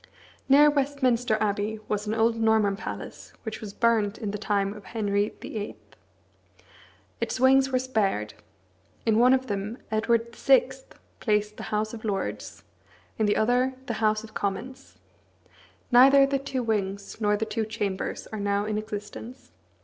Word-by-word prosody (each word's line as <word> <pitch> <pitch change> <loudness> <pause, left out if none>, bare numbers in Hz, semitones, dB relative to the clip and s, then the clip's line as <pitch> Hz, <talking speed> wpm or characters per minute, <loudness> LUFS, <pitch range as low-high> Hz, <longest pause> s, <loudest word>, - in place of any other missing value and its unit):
Near 295 +2 +7
Westminster 260 -5 +1
Abbey 210 +1 -1
was 210 0 -2
an 215 - -1
old 225 +1 +2
Norman 220 -3 +3
palace 215 - -8
which 220 -1 -6
was 210 -2 -6
burnt 220 -2 +1
in 215 -4 -4
the 210 - -5
time 200 -1 0
of 210 -1 -12
Henry 205 -2 -1
VIII. 210 -2 -5 1.5
Its - - -2
wings 265 +1 +5
were 255 - +2
spared. 210 - -1 0.7
In 220 -1 +3
one 250 +2 +6
of 260 0 +3
them 205 +1 -4
Edward 230 +2 0
VI. - - +4 0.5
placed 210 -1 0
the - - -7
House 215 +1 -1
of 220 - -8
Lords, 200 -3 -4 0.6
in 215 - +2
the 205 - +2
other 250 +4 +2
the 230 -4 -4
House 215 0 +2
of 220 -1 -12
Commons. 230 +7 -5 0.9
Neither 275 +3 +7
the 275 0 0
two 265 -2 -3
wings 200 -3 -2
nor 210 -1 +2
the 220 - -1
two 225 0 -2
chambers 210 -3 -3
are 215 - -3
now 200 0 0
in 215 0 -1
existence. 215 +3 -8
220 Hz, 155 wpm, -26 LUFS, 205-245 Hz, 1.5 s, Near